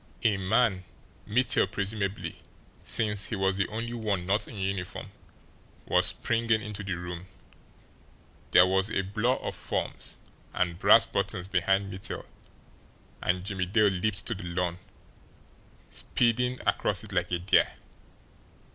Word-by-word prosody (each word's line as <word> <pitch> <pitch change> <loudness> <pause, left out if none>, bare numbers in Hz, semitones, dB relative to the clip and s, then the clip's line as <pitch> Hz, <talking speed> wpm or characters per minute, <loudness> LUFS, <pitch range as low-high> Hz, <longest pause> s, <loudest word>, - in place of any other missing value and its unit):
A 105 -2 +4
man, 95 0 +2 0.4
Mittel 125 -2 +4
presumably, 100 -1 -3 0.4
since 105 -3 +2
he 110 - -2
was 95 -1 +1
the 95 - +1
only 115 +2 -4
one 105 -6 -1
not 100 +4 +1
in 110 - -9
uniform, 95 -2 -3 0.7
was - - +3
springing 115 -1 +1
into 105 -1 -6
the 95 -3 -2
room. 90 +1 -7 1.2
There 90 - +7
was 95 +2 +2
a 95 - 0
blur 110 +6 +1
of - - -5
forms - - -3 0.4
and 85 -1 0
brass - - +7
buttons 100 -2 -2
behind 95 +1 +1
Mittel 95 - -5 1.0
and 90 +1 0
Jimmie 95 -2 -2
Dale 105 +2 +4
leaped 95 +2 0
to 115 - +2
the 100 -3 -8
lawn, 85 0 -2 1.1
speeding 125 +1 +1
across - - +1
it - - -8
like - - 0
a 90 - +2
deer. 90 +4 +3
100 Hz, 135 wpm, -28 LUFS, 95-110 Hz, 1.2 s, There